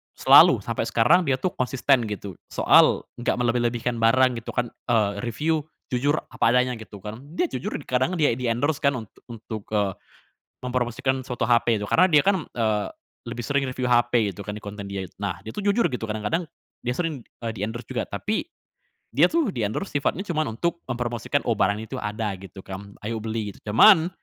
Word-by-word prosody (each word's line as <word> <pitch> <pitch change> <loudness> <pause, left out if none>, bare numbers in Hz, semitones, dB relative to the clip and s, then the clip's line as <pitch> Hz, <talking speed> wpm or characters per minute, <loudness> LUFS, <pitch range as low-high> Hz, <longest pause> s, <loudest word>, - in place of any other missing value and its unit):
selalu - - +7
sampai - - -2
sekarang 165 +10 +3
dia 135 - +3
tuh 175 +8 -2
konsisten 130 -2 +1
gitu 100 -3 -6
soal - - +4 0.2
enggak 120 - 0
melebih-lebihkan 120 -1 0
barang 125 +2 +3
gitu 115 - -8
kan, 120 -1 -1 0.2
eee, 110 -4 +3 0.2
review 155 +7 0 0.3
jujur 140 +4 +2 0.2
apa 115 - +2
adanya, 125 -1 +2
gitu 105 -3 -11
kan. 105 +2 -7 0.2
Dia 350 - 0
jujur 210 - -4
di - - -5
kadang 130 +9 0
dia 155 -4 +3
di-endorse 125 +5 0
kan 140 -1 +2
untuk 110 -4 -9
untuk, 110 -2 -7
eee, 100 -2 +2 0.7
mempromosikan 125 +1 -1
suatu 125 -1 -3
HP 120 -1 +3
itu, 105 - -4
karena 185 - +4
dia 150 -3 +6
kan, 195 -3 +3 0.2
eee, 110 -2 +1 0.4
lebih 120 +1 -5
sering 140 +1 0
review 130 0 -3
HP 120 -3 +3
gitu 95 - -9
kan 105 - -4
di 105 - -9
konten 100 -1 -7
dia 100 -1 -4
itu. 90 - -10
Nah, 100 -2 -2
itu 110 - -7
jujur 205 +3 +2
gitu 120 -3 -4
kadang-kadang 110 +11 -2 0.3
dia 125 0 -2
sering, 165 -4 -2 0.2
eee, 115 - -1
di-endorse 110 +3 -4
juga 120 -3 -2
tapi, 210 - -2 0.7
dia - - +5
tuh 315 -9 +1
di-endorse 110 - -3
sifatnya 170 +6 -1
cuman 155 - -2
untuk 170 +5 -1
mempromosikan 120 +2 -1
"oh 120 - +2
barang 100 +1 +2
itu - - -6
ada," 105 0 -2
gitu 95 0 -11
kan, 100 +1 -8
"ayo 115 +1 -2
beli," 110 -1 -3
gitu. 105 - -10
Cuman, 165 - +7
120 Hz, 190 wpm, -24 LUFS, 110-140 Hz, 0.7 s, selalu